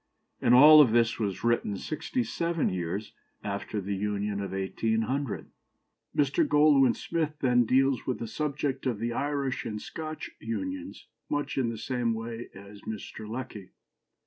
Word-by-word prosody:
" - - -45
And 125 - +5
all 150 +3 +10
this 115 -2 +2
was 100 -4 -2
written 115 -4 +1
sixty 245 - -2
seven 170 -6 -1
years 90 +3 -4 0.3
after 100 +1 -3
the 100 0 -3
Union 100 0 -2
of 100 - -4
1800. 110 +6 -2 0.7
Mr. 140 -2 +3
Goldwin 145 -4 +5
Smith 160 -2 -2
then 125 -2 +4
deals 135 +1 +2
with 130 - 0
the - - -5
subject 140 0 -2
of 120 -4 0
the 115 +2 -2
Irish 140 -1 -1
and 105 -1 -4
Scotch 155 +6 -6
unions 280 - -5 0.2
much 145 -1 -2
in 130 -4 +1
the 115 - -5
same 120 0 -1
way 115 +1 -6
as 100 +1 -12
Mr. 110 0 -7
Lecky. 110 -5 -7
120 Hz, 150 wpm, -28 LUFS, 105-145 Hz, 0.7 s, all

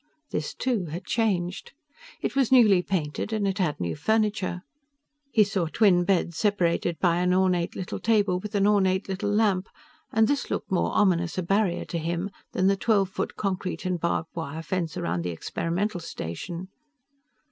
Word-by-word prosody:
This, 150 - -3
too, 240 -8 -1
had 170 +4 -6
changed. 205 - -1 0.5
It - - -2
was 270 -3 +2
newly 215 -8 +6
painted 175 +1 -2
and 215 -2 0
it 195 +1 -2
had 170 -6 0
new 85 -2 -2
furniture. 210 -4 0 0.7
He 220 - +5
saw 195 -4 -1
twin 180 -1 +3
beds 175 -3 +1
separated 175 -5 +1
by 175 -2 +2
an 180 +1 +2
ornate 180 -2 +1
little 185 - -4
table 205 -5 +2
with 210 +2 -6
an 200 -1 +3
ornate 195 -2 +2
little 195 +2 -2
lamp, 205 -3 +2 0.4
and 220 0 +4
this 285 -2 -1
looked - - -3
more 185 - +1
ominous 175 -4 +2
a 185 - 0
barrier 195 0 +1
to 170 - -3
him 170 +4 -2 0.2
than 185 - +1
the 195 +1 +4
twelve 200 -2 +2
foot - - -3
concrete 190 -1 -3
and 180 -1 -1
barbed 170 -1 -1
wire 160 -1 -5
fence 170 -1 -2
around 85 +1 -1
the 90 - -2
experimental 175 - -2
station. 170 - -6
185 Hz, 170 wpm, -26 LUFS, 170-205 Hz, 0.7 s, newly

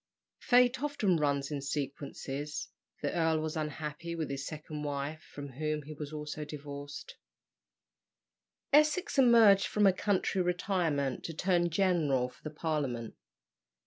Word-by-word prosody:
Fate 250 +1 +4
often 245 - +1
runs 140 -1 0
in 145 -2 -2
sequences 140 +1 -4 0.3
the 145 - 0
earl 160 -2 +2
was 155 0 -3
unhappy 155 +2 -4
with 160 -4 -3
his 135 0 -4
second 155 -1 -6
wife, 145 +2 -3
from 145 -1 -7
whom 150 +3 -2
he 155 +2 -8
also 150 0 -6
was 150 - -5
divorced. 145 -1 -8 1.6
Essex 305 +3 +4
emerged 230 -6 +7
from 210 -1 +2
a 195 - +6
country 190 -1 +1
retirement 175 -7 0
to 165 - -5
turn 175 0 +2
general 160 -8 +2
for - - -21
the 155 - -5
Parliament. 145 -7 -2
155 Hz, 135 wpm, -31 LUFS, 145-180 Hz, 1.6 s, emerged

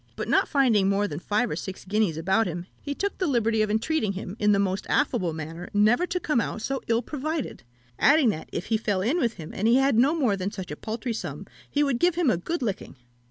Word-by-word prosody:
but - - -4
not - - +3
finding 230 -9 +3
more 200 +1 +1
than 150 -3 -5
five 210 +6 0
or - - -1
six 190 -2 -7
guineas 200 -4 +1
about 190 +7 +2
him, 175 0 -5 0.2
he 285 -1 -4
took 400 +4 -2
the 370 - +1
liberty 230 -5 +2
of 215 - +1
entreating 220 0 0
him, 190 0 -6
in 210 0 +3
the 200 - +4
most 195 -1 -1
affable 175 -3 +1
manner, 160 +2 -7
never 225 +12 +4
to 360 - -1
come 300 -8 +1
out - - -4
so 270 +4 -3
ill 230 +1 +1
provided; 305 - -4 0.4
adding 285 -4 +5
that, 160 -7 -4
if - - -4
he - - +4
fell 205 -4 -1
in 275 - +1
with 235 -6 +1
him, 160 -5 -9
and 210 - 0
he 235 - +5
had 270 -3 +3
no 280 +6 +4
more 255 -11 +2
than 190 0 -2
such 190 -5 -7
a - - -4
paltry 225 +6 -4
sum, 220 - -6 0.2
he 290 - +1
would 275 -4 0
give 350 -1 +3
him 335 -7 +3
a 175 - +1
good 285 - -3
licking. 205 -10 -4
220 Hz, 250 wpm, -26 LUFS, 195-275 Hz, 0.4 s, adding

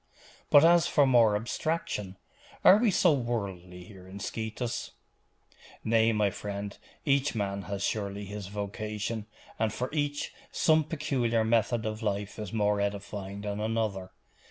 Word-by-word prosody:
But 145 +2 +8
as 170 0 +5
for 145 - +4
more 120 -5 +5
abstraction, 105 - -2 0.5
are 190 - +9
we 230 +1 +3
so 180 -3 +4
worldly 100 -8 -3
here 95 0 -13
in 95 +1 -9
Scetis?' 115 +3 -4 0.9
'Nay, 115 0 +3
my 105 -2 +2
friend, 100 +1 -5 0.3
each 140 -2 +2
man 100 -2 -2
has 100 -1 -3
surely 100 -1 -2
his 100 -1 -6
vocation, 105 +2 -4 0.3
and 110 -1 +1
for 125 +5 -3
each 145 -1 -2 0.2
some 155 -1 +3
peculiar 135 -8 0
method 115 0 +1
of 110 +1 -3
life 105 -1 -2
is 105 -3 -5
more 105 -2 +1
edifying 100 0 -4
than 105 0 -3
another. 110 -4 -1
110 Hz, 140 wpm, -29 LUFS, 100-120 Hz, 0.9 s, are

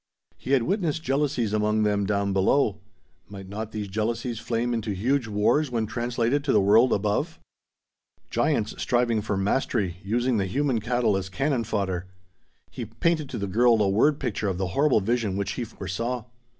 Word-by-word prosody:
He 135 - -3
had 130 -4 +4
witnessed 165 - -1
jealousies 135 -6 0
among 105 0 +1
them 100 -1 +1
down 100 -1 0
below. 100 +2 +2 0.5
Might 95 -1 -9
not 110 +2 -5
these 105 -2 -4
jealousies 110 +3 -2
flame 120 +1 -1
into 110 -3 -2
huge 125 +5 0
wars 110 +8 +2
when 115 -3 -1
translated 120 +4 -1
to 145 - +1
the 105 - +5
world 110 +6 +5
above? 105 - 0 0.9
Giants - - +1
striving 120 -3 +1
for 105 -1 -2
mastery, 100 -3 0
using 120 +4 0
the 95 -2 0
human 135 +2 0
cattle 115 -1 +1
as 95 -1 -3
cannon 135 +2 -1
fodder! 95 -4 -2 0.6
He 115 +7 -5
painted 150 +7 -1
to - - -5
the 100 - -2
girl 115 +4 +3
a 105 - +3
word 140 +9 +3
picture 105 0 -2
of 95 -2 -1
the 95 -1 -2
horrible 140 -1 +3
vision 110 -2 0
which 100 - -2
he 125 - -3
foresaw. 115 +4 -4
110 Hz, 175 wpm, -25 LUFS, 100-125 Hz, 0.9 s, the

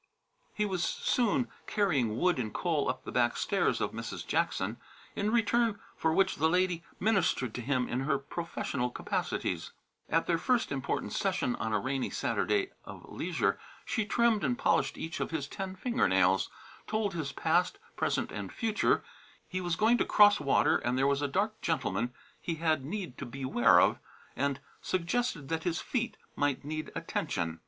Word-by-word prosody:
He 210 - +1
was 185 -4 -1
soon 205 - +1 0.2
carrying 140 - +1
wood 180 0 +2
and 110 -3 -2
coal 160 - 0
up 130 0 -3
the - - -6
back 120 -1 +2
stairs - - +1
of - - -1
Mrs. - - -6
Jackson, - - 0 0.4
in 205 +1 0
return 230 -1 +2 0.2
for 160 - +1
which 190 +3 +2
the 160 +2 +3
lady 180 -1 +1 0.2
ministered 185 - +1
to 125 - -4
him 125 0 0
in 125 - -1
her 140 +1 +1
professional 140 -3 -3
capacities. - - -2 0.4
At 165 +1 +2
their 170 -1 +1
first 245 +5 +1
important 135 -2 -2
session 125 - 0
on 110 - -2
a 105 - +3
rainy 130 +5 -1
Saturday 395 -1 0
of - - -11
leisure - - 0 0.3
she 220 - 0
trimmed 230 -2 +3
and 125 -4 +1
polished - - +2
each 165 +1 -5
of - - -1
his 160 -4 -3
ten 190 +4 -5
finger 240 +5 +1
nails, 95 0 +3 0.4
told 215 -2 0
his 155 -5 -3
past, 175 +5 +1 0.2
present - - 0
and - - -5
future 225 -2 +1 0.4
he 185 0 -3
was 175 -2 0
going 225 +6 +4
to - - +4
cross 205 0 +6
water 140 -2 +3
and 125 +1 -1
there 135 - +3
was 140 0 +2
a 145 - +1
dark 205 +9 -1
gentleman 120 - 0 0.3
he 165 - -2
had 160 -3 +1
need 170 -3 -5
to - - -4
beware 130 -1 +4
of - - +3 0.4
and 140 0 -1 0.2
suggested 185 - -1
that 160 0 -1
his 165 -1 -1
feet 235 -3 -2 0.2
might 145 -2 0
need 155 +1 -4
attention. 85 - -2
160 Hz, 175 wpm, -31 LUFS, 130-200 Hz, 0.4 s, cross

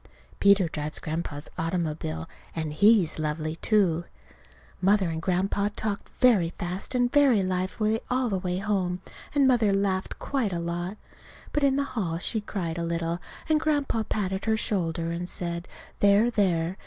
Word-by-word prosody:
(Peter 200 -2 +5
drives 150 -1 -2
Grandpa's 155 -2 -4
automobile, 160 - -2 0.3
and 160 -2 -3
he's 200 -1 +4
lovely, 155 +1 -2
too.) 180 -6 +2 0.8
Mother 195 0 +4
and 160 0 -3
Grandpa 195 +3 +1
talked 205 -2 -3
very 210 -10 +5
fast 180 +7 -3
and 245 -1 +2
very 270 -9 +5
lively 185 +4 0
all 255 0 +1
the 195 -4 0
way 180 0 -2
home, 190 -2 -1 0.3
and 280 -2 +5
Mother 235 -5 +4
laughed 195 -1 0
quite 250 -9 -1
a 170 - -1
lot. 175 +4 -3 0.6
But 295 - +1
in 275 -1 +3
the 280 - +1
hall 175 -9 -1
she 215 +5 -2
cried 175 -5 -3
a - - -1
little, 170 0 -1 0.3
and 310 -1 +3
Grandpa 290 -7 +1
patted 190 -3 -2
her 220 -1 +2
shoulder, 170 -7 -1
and 175 +1 -4
said, 170 0 -4 0.3
"There, 205 +4 +5
there!" 180 -4 +1
185 Hz, 155 wpm, -27 LUFS, 170-215 Hz, 0.8 s, Peter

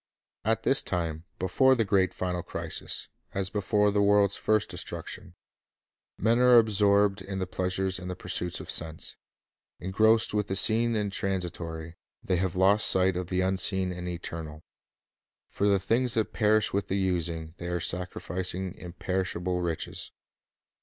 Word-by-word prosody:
At 115 +1 +1
this 135 - +2
time, 85 -3 -3
before 130 +9 +4
the 115 -3 +1
great 95 -3 +3
final 90 -1 -2
crisis, - - -3 0.3
as 95 -1 -1
before 105 0 +2
the 100 0 +2
world's 100 -1 +4
first 110 -1 +1
destruction, - - -7 0.8
men 115 +3 +2
are 125 -1 +7
absorbed 105 -2 +4
in 95 0 -5
the 95 - -1
pleasures 95 +1 -1
and 90 0 -6
the 90 - -3
pursuits 90 -1 -2
of - - -5
sense. 80 -1 -3 0.6
Engrossed 110 +6 +3
with 105 -1 0
the 95 - -2
seen 115 +3 +2
and 105 -2 -1
transitory, 85 -4 -3 0.3
they 90 - +1
have 95 0 -1
lost 100 +3 +4
sight 95 0 +3
of 90 -1 -3
the 90 +1 0
unseen 95 0 +1
and 90 0 -5
eternal. 80 -3 -6 0.9
For 100 - +1
the 100 - +4
things 115 +5 +1
that 110 -2 0
perish 110 -1 +2
with 100 -1 0
the 95 - 0
using, 85 -4 -1
they 85 - -5
are 90 0 -1
sacrificing 90 +1 -3
imperishable 90 0 -3
riches. 85 -2 -3
95 Hz, 155 wpm, -28 LUFS, 90-105 Hz, 0.9 s, are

